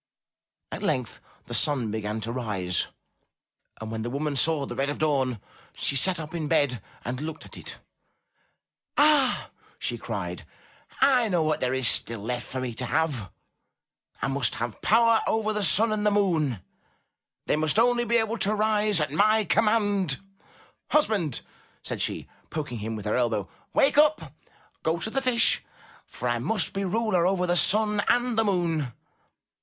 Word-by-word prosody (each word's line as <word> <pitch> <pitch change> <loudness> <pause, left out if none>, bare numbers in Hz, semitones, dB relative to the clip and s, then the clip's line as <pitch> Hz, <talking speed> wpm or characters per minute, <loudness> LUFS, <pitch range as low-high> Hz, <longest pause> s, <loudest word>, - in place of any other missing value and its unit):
At - - -5
length 125 -4 -1 0.3
the - - -8
sun 130 -7 +1
began 110 0 -3
to 115 +2 -4
rise, 100 -8 -1 0.9
and 110 0 -6
when 110 0 -3
the 120 - -3
woman 145 +3 -2
saw 150 +1 +1
the - - -6
red 140 +1 0
of 145 - -3
dawn, 135 -6 0 0.4
she 140 - 0
sat 180 +6 +3
up 155 0 -7
in 160 -3 -3
bed 130 -6 +1 0.2
and 125 +4 -3
looked 160 0 -6
at - - -12
it. - - -8 1.2
''Ah," 290 -3 +3 0.3
she - - -3
cried, - - -5 0.6
''I 255 -5 +4
know 175 -4 +2
what 155 -1 0
there 125 - +1
is 130 -2 +2
still 115 -1 +1
left 120 +3 -3
for 130 - -4
me 125 -2 -3
to - - -2
have. 145 - -1 0.9
I - - +2
must 135 -4 +1
have 120 -2 -5
power 230 +1 +4
over 215 -1 0
the 210 - -1
sun 210 +5 +4
and 210 -1 -1
the 210 - +4
moon. 165 - +1 0.8
They - - +2
must 155 +3 +1
only 240 +1 +4
be 235 0 +2
able 225 0 -1
to 210 +2 +1
rise 210 -2 +2
at 150 -3 -1
my 215 +6 +3
command." 205 -8 +2 0.4
* - - -30
'Husband," 205 - +1 0.4
said - - -3
she, - - -3 0.2
poking 145 -7 -4
him 110 +2 -4
with 105 -1 -7
her 105 - 0
elbow, 115 -5 0 0.3
"wake 280 +1 +4
up! 305 +1 +3 0.5
Go 160 +1 0
to 195 +7 -3
the 270 - 0
Fish, 250 -3 +2 0.4
for 125 - -5
I 120 0 0
must 210 - 0
be 195 0 -2
ruler 190 -3 +1
over 185 -1 +1
the 175 0 +1
sun 210 +3 +3
and 245 -1 +2
the 225 - +3
moon." 165 - 0
160 Hz, 170 wpm, -26 LUFS, -, 1.2 s, I